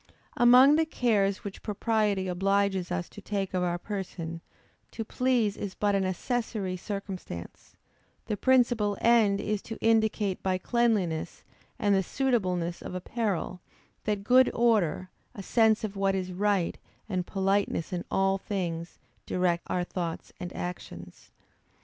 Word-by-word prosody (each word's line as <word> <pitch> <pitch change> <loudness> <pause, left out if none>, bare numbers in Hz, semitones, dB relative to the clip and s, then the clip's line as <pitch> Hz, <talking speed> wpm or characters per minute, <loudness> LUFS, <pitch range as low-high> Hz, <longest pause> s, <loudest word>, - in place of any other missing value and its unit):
_ - - -27 0.2
Among 255 +5 +7
the 320 - +3
cares 205 - +1
which 200 -2 -7
propriety 210 -2 0
obliges 195 0 +1
us 180 -1 -2
to 205 - -11
take 195 -1 -3
of 185 - 0
our 175 -1 0
person, 175 -4 -5 0.5
to 225 - -5
please 240 -4 +1
is 195 -2 -5
but 205 -1 +1
an 195 -1 +1
accessary 200 0 -2
circumstance; 190 - -7 0.5
the 210 - -2
principal 235 -4 +2
end 225 -4 +4
is 210 -1 -2
to 225 - -7
indicate 220 -3 +1
by 185 -1 0
cleanliness, 205 -6 0 0.3
and 205 -1 +2
the 195 - +4
suitableness 185 -8 -1
of - - -7
apparel, 185 -2 -2 0.4
that 210 -2 -1
good 255 +4 +5
order, 205 -7 +2 0.2
a 195 - -7
sense 220 +2 +3
of 210 -2 -3
what 195 0 +1
is 185 -1 -3
right, 195 -2 0 0.3
and 185 -4 -2
politeness 195 -3 0
in 175 - -2
all 195 0 +2
things, 175 -4 -4 0.3
direct 175 -2 0
our 180 - 0
thoughts 175 -2 -5
and 180 0 -5
actions. 90 - -7
195 Hz, 145 wpm, -28 LUFS, 180-220 Hz, 0.5 s, Among